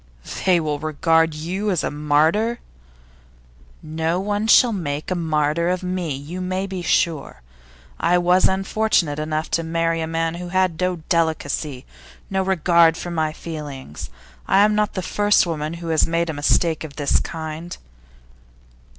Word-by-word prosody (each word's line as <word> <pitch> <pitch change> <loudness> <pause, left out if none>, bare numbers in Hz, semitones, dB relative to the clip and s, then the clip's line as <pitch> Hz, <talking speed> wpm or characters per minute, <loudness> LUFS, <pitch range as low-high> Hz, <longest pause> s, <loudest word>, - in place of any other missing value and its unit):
'They 180 -2 +5
will 150 -2 -2
regard 160 +1 +1
you 185 +7 -3
as 180 -5 0
a - - -1
martyr?' 155 +11 +1 1.2
'No 160 +2 -1
one 205 +2 -1
shall 235 +1 +6
make 150 -4 -4
a - - +1
martyr 160 0 0
of 185 0 -1
me, 180 -5 -2
you 155 +7 -7
may 185 +1 -2
be 190 -2 -5
sure. 160 - 0 0.6
I 180 - +3
was 180 +1 +4
unfortunate 190 -5 0
enough 155 0 -3
to 165 - +1
marry 165 0 0
a 160 - -2
man 165 0 -1
who 175 - -6
had 185 -2 0
no 180 0 +1
delicacy, 155 -4 -1 0.5
no 190 0 +1
regard 170 -3 +3
for 175 - -6
my 160 -2 0
feelings. 145 - -8 0.4
I 195 - +4
am 215 - +2
not 210 0 0
the 185 - -2
first 205 +3 +3
woman 155 -1 -3
who 170 -1 -7
has 160 -1 +3
made 165 0 0
a - - -7
mistake 155 +2 +1
of 150 -3 -9
this 145 -2 +1
kind. 160 +1 -6
165 Hz, 160 wpm, -21 LUFS, 155-185 Hz, 1.2 s, shall